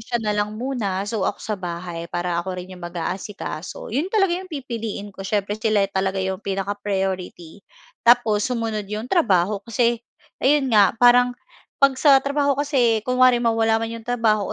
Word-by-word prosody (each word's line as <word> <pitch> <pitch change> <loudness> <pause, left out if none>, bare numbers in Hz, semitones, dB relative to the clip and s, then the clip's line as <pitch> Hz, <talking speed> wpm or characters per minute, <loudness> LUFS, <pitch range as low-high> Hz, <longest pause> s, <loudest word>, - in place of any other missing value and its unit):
siya 240 +2 -2
na 215 -3 -1
lang 210 +1 -2
muna. 215 -6 -2
So 205 -1 -1
ako - - -4
sa 210 -3 -3
bahay 170 -1 -5
para 175 0 -2
ako 185 +1 -5
rin 180 +1 -8
yung 180 - -11
mag-aasikaso. 175 +1 -6
Yon 290 +9 0
talaga 390 -3 +2
'yong 370 +1 -4
pipiliin 230 - -5
ko - - -12
siyempre 205 +2 -2
sila 215 -2 +2
talaga 190 0 -1
yung 190 0 -3
pinaka-priority 195 -3 -3 0.4
tapos 235 -2 +3
sumunod 225 -4 -3
yung 210 +2 -4
trabaho 205 - +2
kasi 235 +2 0 0.4
ayun 270 -2 +2
nga 205 -1 +5
parang 245 +1 +5 0.4
'pag 275 -1 +5
sa 275 0 +6
trabaho 280 0 +1
kasi 260 -6 +2
kunwari 250 -1 +4
mawala 225 -1 +2
man 225 - -2
yung - - -19
trabaho 225 -4 +1
215 Hz, 165 wpm, -22 LUFS, 195-245 Hz, 0.4 s, sa